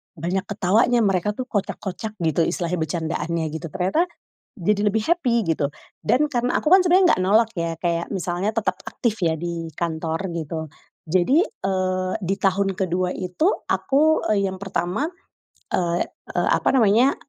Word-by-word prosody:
banyak 180 +4 -2
ketawanya 215 +4 +2
mereka 195 0 +1
tuh 250 +4 -5
kocak-kocak 205 -1 -4
gitu, 165 -1 +2
istilahnya 175 0 -2
bercandaannya 160 0 -2
gitu. 160 +1 -5
Ternyata, 190 - +1 0.6
jadi 205 +3 +1
lebih 220 +1 0
happy, 335 -8 +2
gitu, 155 -3 +1 0.4
dan 295 +4 +3
karena 245 -3 0
aku - - -1
kan 370 +2 +7
sebenernya 360 0 +5
nggak 185 - -1
nolak 220 +4 +4
ya 170 -1 -1
kayak 170 0 -1
misalnya 185 +2 -1
tetap 220 -1 -1
aktif 230 -3 -2
ya 160 - +2
di 170 0 -4
kantor, 160 -1 -2
gitu. 160 -1 -4 0.4
Jadi, 185 - +3
eee, 185 - -2
di 190 +2 0
tahun 195 0 +1
ke-2 180 -1 0
itu 185 - -1 0.2
aku, 305 +3 +3
eee, 200 -2 +2
yang 190 - -7
pertama, 195 - -1 0.7
eee 175 -1 +1 0.3
eee, - - +1
apa - - +2
namanya, 235 +2 +4
190 Hz, 155 wpm, -23 LUFS, 170-225 Hz, 0.7 s, kan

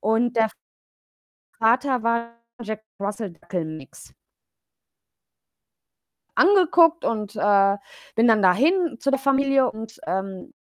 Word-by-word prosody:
und 225 +3 0
der 220 -1 +2 1.1
Vater 250 +2 +2
war 235 0 -1 0.3
Jack-Russell-Dackel-Mix. 200 - -7 2.2
Angeguckt 345 -4 +4
und, 215 -1 -3
äh, 200 -1 +3 0.4
bin 230 +1 +3
dann 215 -2 +4
dahin 285 - +2
zu 275 - 0
der 275 - +1
Familie 275 -1 +2
und, 225 0 -10
ähm, 190 +9 -5
225 Hz, 90 wpm, -23 LUFS, 205-275 Hz, 2.2 s, Angeguckt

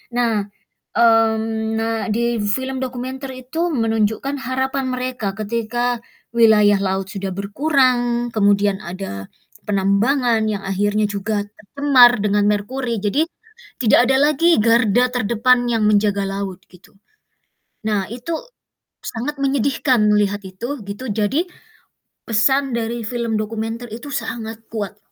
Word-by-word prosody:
Nah 225 -4 +1 0.4
mmm, 225 -1 +2
nah 225 0 -1
di 235 0 0
film 260 +5 -2
dokumenter 260 +2 -5
itu 325 +8 -2
menunjukkan 225 +2 0
harapan 265 +1 -2
mereka, 250 -5 -3
ketika 235 +2 -2 0.3
wilayah 210 -3 +5
laut 190 0 -1
sudah 195 -1 -4
berkurang, 245 +1 +1
kemudian 200 -1 +2
ada 170 - -7 0.4
penambangan 220 +4 +2
yang 200 -2 -3
akhirnya 205 +2 +1
juga 205 +1 -2
tercemar 245 +3 +4
dengan 205 0 +2
merkuri, 230 +3 -2
jadi 215 +9 +1 0.6
tidak 225 - +5
ada 265 - +4
lagi 335 +4 +3
garda 235 +1 +3
terdepan 245 +2 +2
yang 220 -2 +1
menjaga 205 -1 +2
laut, 195 -1 -5
gitu. 180 +2 -20 0.9
Nah, 205 -3 0
itu 250 +8 -5 0.7
sangat 250 +6 -4
menyedihkan 265 -3 +2
melihat 205 -1 +2
itu, 235 +10 -5
gitu, 205 +6 -6
jadi 220 - 0 0.8
pesan 265 +5 +2
dari 230 0 -3
film 235 -2 -2
dokumenter 225 +2 -4
itu 260 +6 -8
sangat 225 -1 -5
kuat. 205 -2 -5
225 Hz, 115 wpm, -20 LUFS, 205-250 Hz, 0.9 s, wilayah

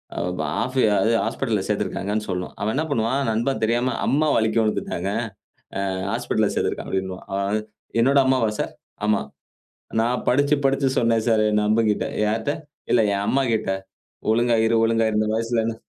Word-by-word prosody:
ஆ - - -7
வு - - -2
ப - - +1 0.2
ஆஃபி 130 +1 0 0.2
அது 110 +4 +2
ஹாஸ்பிட்டல்ல - - -1
சேத்திருக்காங்கன்னு 105 +2 -1
சொல்லணும். 90 -1 -3
அவன் 110 +2 0
என்ன 150 - +1
பண்ணுவான், 120 +2 +1
நண்பன் 120 +5 -1
தெரியாம 120 +2 +1
"அம்மா 155 +3 +2
வலுக்கி 110 0 +2
விழுந்துட்டாங்க. 100 -4 -1 0.8
அ - - -1 0.2
ஹாஸ்பிட்டல்ல 110 -2 0
சேத்திருக்கான்" - - -1
அப்டின்னுவான். 95 -1 -3
அவன் 100 +2 0 0.4
"என்னோட 135 +4 +4
அம்மாவா 130 -4 +3
சார்? - - -2 0.3
ஆமா. 105 -1 +2 0.8
நான் 120 +2 0
படிச்சி, 140 +3 +3
படிச்சி 135 0 +1
சொன்னேன் 115 -2 +2
சார் 110 -2 +3
என் 105 0 +2
நண்பகிட்ட! 110 0 +2 0.2
யார்ட்ட? 110 +6 0 0.4
இல்ல 120 - +5
என் 100 0 -1
அம்மா 135 - +2
கிட்ட. 110 -3 0 0.6
ஒழுங்கா 120 +1 +3
இரு 115 +1 +2
ஒழுங்கா 115 0 +2
இரு 105 - -1
இந்த 110 - +1
வயசுலன்னு" 115 0 0
115 Hz, 160 wpm, -23 LUFS, 105-120 Hz, 0.8 s, இல்ல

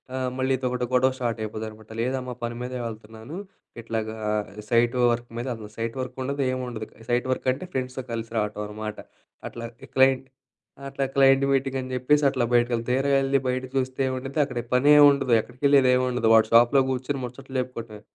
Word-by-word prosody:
ఆహ్, 130 -1 -1
మళ్ళీ 130 +1 +1
ఇదొకటి 125 -1 -2
గొడవ 130 +1 +4
స్టార్ట్ 120 -3 -2
అయిపోద్దనమాట. 110 0 -7
లేదమ్మా 125 +1 -2
పని 120 0 -3
మీదే 125 0 -4
వెళ్తున్నాను. 110 +6 -9 0.5
ఇట్లాగా 110 -1 -3 0.5
సైట్ 120 +1 +3 0.2
వర్క్ 120 0 -3
మీద 120 - -3
అసలు 110 -1 -10
సైట్ 115 0 -3
వర్క్ 130 0 -5
ఉండదు. 140 +2 -2
ఏం 130 - -2
ఉండదు. 110 -3 -5 0.2
సైట్ 120 +1 +1
వర్క్ - - -2
అంటే 130 +8 -5
ఫ్రెండ్స్‌తో 130 0 -3
కలిసి 115 0 -4
రావటం 105 -1 -1
అనమాట. 105 0 -6 0.5
అట్లాగ 115 0 -7 0.2
క్లయింట్ 130 0 +4 0.6
అట్లా 135 0 -2
క్లైంట్ 135 0 +5
మీటింగ్ 135 0 0
అని 130 - -6
జెప్పేసి 145 +4 +2
అట్లా 130 -3 -1
బయటికెళ్ళి. 120 -1 +2
తీర 135 +2 +1
యెళ్లి 135 0 +2
బయట 130 0 -1
చూస్తే 130 0 -1
ఏం 130 - -1
ఉండిద్ది, 135 +4 -4
అక్కడ 125 -3 -4
పనేముండదు 140 -1 +6
ఎక్కడికెళ్ళేదేముండదు. 125 -1 +2
వాడి 110 -1 +6
షాప్‌లో 120 +4 +6
గూర్చొని 130 +2 -2
ముచ్చట్లు 130 +2 -6
చెప్పుకొటమే. 115 -4 -8
125 Hz, 165 wpm, -25 LUFS, 115-135 Hz, 0.6 s, పనేముండదు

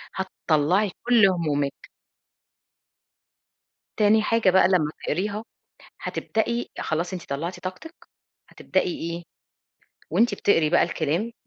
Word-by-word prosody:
هتطلّعي 185 +1 +1
كل 235 -5 +5
همومِك. 145 -6 -2 2.1
تاني 215 +1 +4
حاجة 225 -3 +3
بقى 190 +1 +5
لما 165 -5 +2
تقريها، 205 +6 -2 0.6
هتبدئي 235 +2 -2
خلاص 170 +4 -2
أنتِ 180 - -7
طلعتي 165 +6 -4
طاقتِك، 250 - -7 0.5
هتبدئي 185 -1 -1 0.2
إيه؟ 170 +1 -6 0.9
وأنتِ 205 +5 +3
بتقري 165 -7 +2
بقى 175 - +4
الكلام 170 +7 -1
185 Hz, 100 wpm, -24 LUFS, 165-215 Hz, 2.1 s, كل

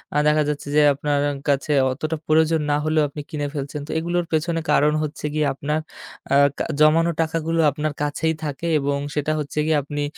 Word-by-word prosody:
আ - - +3
দেখা 150 0 +3
যাচ্ছে 145 -1 -4
যে 150 - +6
আপনার 145 +1 -1 0.3
কাছে 140 +1 +1 0.2
অতটা 155 +4 -3
প্রয়োজন 160 +1 +3
না - - +3
হলেও 155 0 +2
আপনি 150 +1 -7
কিনে 145 -3 -3
ফেলছেন। 145 0 -4
তো, - - -6
এগুলোর 175 +1 -1
পেছনে 165 +1 0
কারণ 150 +1 +4
হচ্ছে 150 0 -5
গিয়ে 155 0 +1
আপনার 150 +3 -2 0.5
আ - - +5 0.5
জমানো 165 +2 +5
টাকাগুলো 165 0 -1
আপনার 150 +2 -3
কাছেই 155 +2 0
থাকে 150 +2 -4
এবং 140 0 -1 0.2
সেটা 150 +1 0
হচ্ছে 150 0 -6
গিয়ে 155 -1 +2
আপনি 145 +1 -4
150 Hz, 185 wpm, -22 LUFS, 145-160 Hz, 0.5 s, যে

